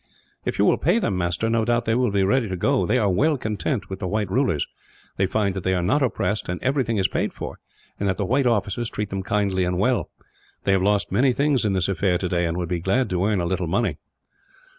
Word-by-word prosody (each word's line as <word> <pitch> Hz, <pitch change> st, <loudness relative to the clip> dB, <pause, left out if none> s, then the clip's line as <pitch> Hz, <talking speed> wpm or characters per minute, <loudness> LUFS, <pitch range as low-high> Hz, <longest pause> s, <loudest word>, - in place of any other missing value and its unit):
"If -, -, -2 dB
you -, -, +3 dB
will -, -, +3 dB
pay 175 Hz, +8 st, +2 dB
them, 155 Hz, -, 0 dB
master, 90 Hz, +4 st, -1 dB
no 115 Hz, 0 st, +1 dB
doubt 120 Hz, +1 st, +1 dB
they 110 Hz, -, +1 dB
will 125 Hz, 0 st, +2 dB
be 100 Hz, -1 st, +1 dB
ready 115 Hz, +3 st, +2 dB
to 95 Hz, -, -3 dB
go. 135 Hz, +9 st, +1 dB
They -, -, +2 dB
are 110 Hz, -4 st, +2 dB
well 145 Hz, -, +2 dB
content 110 Hz, +1 st, -2 dB
with 95 Hz, -1 st, -6 dB
the 95 Hz, -, -3 dB
white 105 Hz, 0 st, -1 dB
rulers. 120 Hz, -, +1 dB, 0.5 s
They 95 Hz, -, +2 dB
find 100 Hz, 0 st, 0 dB
that 95 Hz, -2 st, -5 dB
they 95 Hz, 0 st, +1 dB
are 90 Hz, -, 0 dB
not 145 Hz, +12 st, +2 dB
oppressed, 110 Hz, -6 st, -1 dB
and 90 Hz, -, -2 dB
everything 130 Hz, -4 st, +1 dB
is 95 Hz, -1 st, +3 dB
paid -, -, -2 dB
for; -, -, -7 dB, 0.4 s
and 100 Hz, -, 0 dB
that 95 Hz, -, -1 dB
the 100 Hz, -, -1 dB
white 130 Hz, +5 st, +2 dB
officers 110 Hz, 0 st, 0 dB
treat 105 Hz, -1 st, -4 dB
them 95 Hz, 0 st, -2 dB
kindly 95 Hz, -1 st, 0 dB
and 90 Hz, 0 st, -1 dB
well. 125 Hz, +6 st, +1 dB, 0.5 s
They -, -, +2 dB
have 95 Hz, -1 st, +3 dB
lost 100 Hz, +1 st, +1 dB
many 125 Hz, +6 st, +3 dB
things, 140 Hz, -3 st, +1 dB
in 100 Hz, -, +1 dB
this 95 Hz, -2 st, +1 dB
affair 95 Hz, -1 st, +1 dB
today, 85 Hz, -1 st, 0 dB
and 85 Hz, +1 st, -2 dB
would 90 Hz, -1 st, -2 dB
be 90 Hz, +1 st, -2 dB
glad 95 Hz, +9 st, 0 dB
to 90 Hz, 0 st, 0 dB
earn 105 Hz, -3 st, +1 dB
a -, -, -1 dB
little 90 Hz, 0 st, -1 dB
money. 100 Hz, +8 st, 0 dB
100 Hz, 250 wpm, -23 LUFS, 95-120 Hz, 0.5 s, you